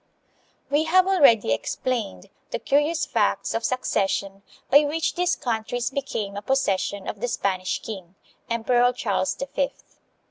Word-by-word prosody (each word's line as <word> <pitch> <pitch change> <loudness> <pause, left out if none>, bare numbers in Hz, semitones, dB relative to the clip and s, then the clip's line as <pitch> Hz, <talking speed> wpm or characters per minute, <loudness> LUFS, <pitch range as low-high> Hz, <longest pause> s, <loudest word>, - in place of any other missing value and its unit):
We 295 +2 +3
have 365 +3 +4
already 280 - +5
explained 225 - -3 0.2
the - - -2
curious 295 +4 +1
facts - - 0
of 225 - -2
succes 235 -6 0
sion 195 0 -3 0.3
by 285 +2 +7
which 310 +2 -1
these 355 0 +1
countries 240 +1 -2
became 225 -8 -3
a 205 - -4
possession 200 -5 0
of 210 - -5
the 245 - 0
Spanish 190 -6 -1
king, 190 -4 -8 0.3
Emperor 240 +2 +2
Charles 195 -6 -1
the - - -4
Fifth. 275 0 -4
240 Hz, 145 wpm, -24 LUFS, 200-280 Hz, 0.3 s, by